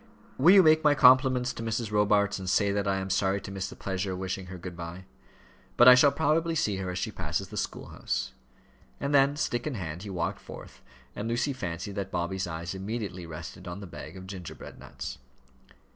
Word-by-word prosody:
"Will 175 +9 +7
you 195 - +8
make 155 0 +5
my 150 -1 +5
compliments 130 -1 +5
to - - -7
Mrs. 115 -1 -2
Robarts, 105 -1 +2
and 95 -1 -4
say 100 +1 +3
that 100 -1 -1
I 95 - +2
am 95 0 -3
sorry 95 +1 +1
to 100 - -8
miss 95 -1 -4
the - - -10
pleasure 95 0 -3
of - - -5
wishing 95 0 -4
her 90 0 -8
good 90 0 -8
bye? 85 +2 -8 0.7
But 120 - +7
I 125 - +12
shall 135 +3 +6
probably 160 +3 +1
see 105 -10 0
her 95 -1 -4
as 90 - -4
she - - -2
passes - - -3
the - - -9
school - - -4
house." - - -3 0.7
And 140 +1 -2
then, 140 0 +5
stick 120 -3 -1
in 145 - -3
hand, 85 -4 -5
he 105 - -7
walked 85 -3 -2
forth, - - -12 0.3
and 105 - -4
Lucy 120 +4 0
fancied 90 -4 -5
that 95 -1 -3
Bobby's 90 +1 -2
eyes 85 +1 -5
immediately 95 -3 -5
rested 80 +1 -9
on 90 +2 -6
the 100 - -8
bag 95 - -9
of 95 - -9
gingerbread 95 -3 -9
nuts. - - -8
100 Hz, 215 wpm, -28 LUFS, 90-125 Hz, 0.7 s, I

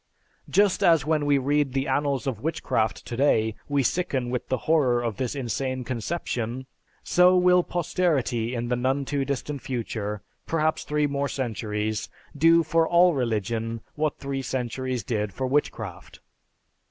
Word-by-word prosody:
Just 200 -1 +3
as 165 -5 +5
when 155 -2 +1
we 145 -1 +4
read 140 0 +1
the 135 +1 0
annals 140 0 0
of 125 -6 -3
witchcraft 115 -7 -1
today 115 -3 +2 0.2
we 140 -1 +2
sicken 130 -5 -1
with 125 - -3
the 130 - 0
horror 140 -7 +3
of 115 -4 -2
this 130 +1 -2
insane 130 0 -2
conception, 125 -1 -3 0.4
so 180 +1 +5
will 180 0 +5
posterity 155 -10 0
in 120 0 -2
the 125 - +2
none 130 +3 0
too 140 0 -1
distant 140 +1 -3
future, 110 -5 -4 0.2
perhaps 155 -1 0
three 150 0 +1
more 140 -1 -1
centuries, 110 -4 -3 0.3
do 165 +3 +5
for 165 +1 +2
all 175 +1 +5
religion 115 -2 -1
what 150 0 -1
three 135 -1 -3
centuries 130 -1 -3
did 105 -2 -2
for 130 - -2
witchcraft. 145 +3 -2
135 Hz, 150 wpm, -25 LUFS, 120-150 Hz, 0.4 s, as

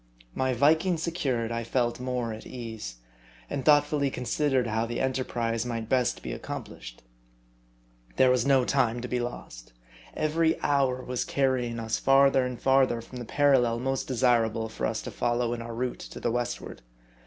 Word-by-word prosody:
My 130 0 0
Viking 160 +7 +3
secured, 135 -9 -2
I 115 0 -2
felt 120 0 -1
more 125 -2 -2
at 110 - -9
ease; 110 - -7 0.6
and 135 - -2
thoughtfully 145 -1 +3
considered 130 0 0
how 110 0 -1
the 120 - -3
enterprise 120 -3 -1
might 115 -2 -4
best 125 -2 +1
be 60 - -4
accomplished. - - -8 1.1
There 130 -1 +5
was 125 -2 +2
no 135 -2 +3
time 120 -3 +1
to 125 - -4
be 125 0 -1
lost. - - -7 0.4
Every 160 +1 +1
hour 135 -3 +1
was 125 -1 -2
carrying 130 -4 0
us 110 0 -2
farther 135 -1 +5
and 125 -1 -6
farther 135 -3 +3
from 125 +2 -9
the 120 - -6
parallel 130 -4 +3
most 135 +2 -2
desirable 115 -3 +1
for 110 - -2
us 110 0 -3
to - - -6
follow 120 0 0
in 120 - -4
our 115 0 -6
route 125 +1 -3
to - - -9
the - - -1
westward. 120 0 -4
125 Hz, 165 wpm, -27 LUFS, 115-135 Hz, 1.1 s, There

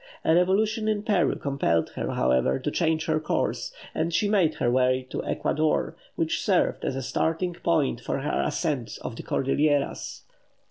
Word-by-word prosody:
A 160 - +4
revolution 210 +5 +2
in 210 -1 0
Peru 205 -6 +2
compelled 135 - 0
her, - - -4
however, 65 +1 +2
to - - -3
change 160 -2 +1
her 155 -1 +1
course, 155 - -1 0.2
and 160 +2 -1
she 205 +5 +2
made 190 -7 +2
her 120 - +1
way 130 0 +2
to - - -3
Ecuador, 155 +2 0 0.2
which - - -1
served - - +1
as - - -1
a 135 - -3
starting 165 +7 -1
point 160 -8 0
for 135 - -2
her 145 - 0
ascent 140 -9 -2
of 115 - -5
the - - -6
Cordilleras. 145 +2 0
155 Hz, 170 wpm, -26 LUFS, 130-175 Hz, 0.2 s, A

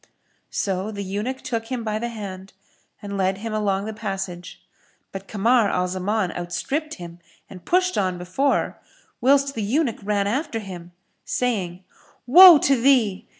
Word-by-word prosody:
So 195 +1 -2
the 200 -2 -5
eunuch 210 +7 -4
took 225 -2 -3
him 245 -1 -4
by 215 -1 -2
the 235 - -3
hand 195 -4 -8 0.5
and 200 -1 -5
led 190 0 +1
him 220 +2 -5
along 200 -2 0
the 220 - -5
passage; 195 -4 -6 0.5
but 195 0 -8
Kamar 220 +2 +2
al 180 0 0
Zaman 185 +1 -1
outstripped 280 - -4
him 170 -1 -10 0.3
and 180 -2 -13
pushed 365 +1 +1
on 185 -2 -1
before, 185 +11 -1 0.4
whilst 275 +2 +3
the 225 - -4
eunuch 240 +4 0
ran 200 0 0
after 235 +3 -2
him, 180 -5 -8 0.3
saying, 190 -8 -2 0.4
"Woe 345 +6 +10
to 270 -3 +2
thee! 235 -8 +2
210 Hz, 150 wpm, -23 LUFS, 190-245 Hz, 0.5 s, Woe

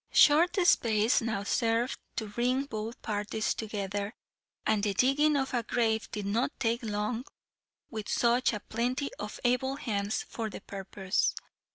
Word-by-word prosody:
Short 335 +5 +6
space 220 -7 +4
now 225 -3 -2
served 230 +4 +1 0.2
to 220 - -2
bring 245 +5 +1
both 225 -1 -5
parties 210 0 -1
together, 205 -1 -3 0.5
and 215 -1 +2
the 200 -1 0
digging 290 +6 +4
of 270 -1 -1
a 240 - +2
grave 225 -1 0
did 210 -1 -4
not 225 +7 +1
take 235 0 +1
long 215 +2 -2 0.7
with 215 -3 -5
such 240 +1 +3
a 210 - -3
plenty 250 +6 -2
of 210 - -6
able 250 +2 +2
hands 205 -6 -2
for 225 -2 -4
the 200 - -8
purpose. 195 0 -1
225 Hz, 150 wpm, -30 LUFS, 210-250 Hz, 0.7 s, Short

